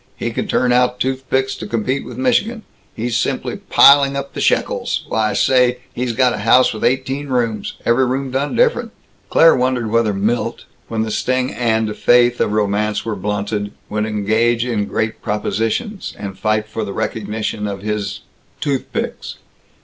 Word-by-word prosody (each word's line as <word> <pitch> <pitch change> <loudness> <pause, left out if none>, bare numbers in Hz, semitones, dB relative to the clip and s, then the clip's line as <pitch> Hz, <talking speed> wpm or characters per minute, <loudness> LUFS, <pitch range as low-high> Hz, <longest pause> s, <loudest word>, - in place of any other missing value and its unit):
He - - -3
can - - -3
turn 125 -1 +1
out 125 0 +2
toothpicks 130 0 -1
to 105 - -6
compete 120 +5 -1
with - - -9
Michigan. 240 -3 +1 0.3
He's 115 +1 -2
simply - - -1
piling 140 0 +5
up 140 0 -4
the - - -4
shekels - - 0
why 110 -1 +1
say, 125 -1 +3 0.2
he's 125 -1 -2
got 125 0 +3
a - - -4
house 120 +5 +4
with 110 - -6
eighteen 135 +3 0
rooms 115 -5 -1
every 120 +3 +3
room 130 +1 -2
done 135 +3 -1
different." - - +1 0.4
Claire 165 0 +6
wondered 125 -3 0
whether 115 -2 +2
Milt, 105 +5 -1 0.2
when 110 -1 -1
the 110 - -4
sting 130 +3 0
and 110 -3 0
faith 120 +1 +3
of - - +1
romance 105 0 0
were 115 -2 -2
blunted, 105 +1 -3 0.2
would 105 0 -1
engage 110 +3 +1
in 110 -4 -1
Great 110 +2 -2
Propositions, 115 - -2
and 100 -2 -6
fight 110 +1 0
for 110 +1 -4
the 100 -2 -5
recognition 105 0 -3
of 100 -1 -5
his 105 -1 -3 0.4
toothpicks. 140 -3 -3
115 Hz, 165 wpm, -18 LUFS, 105-130 Hz, 0.4 s, Claire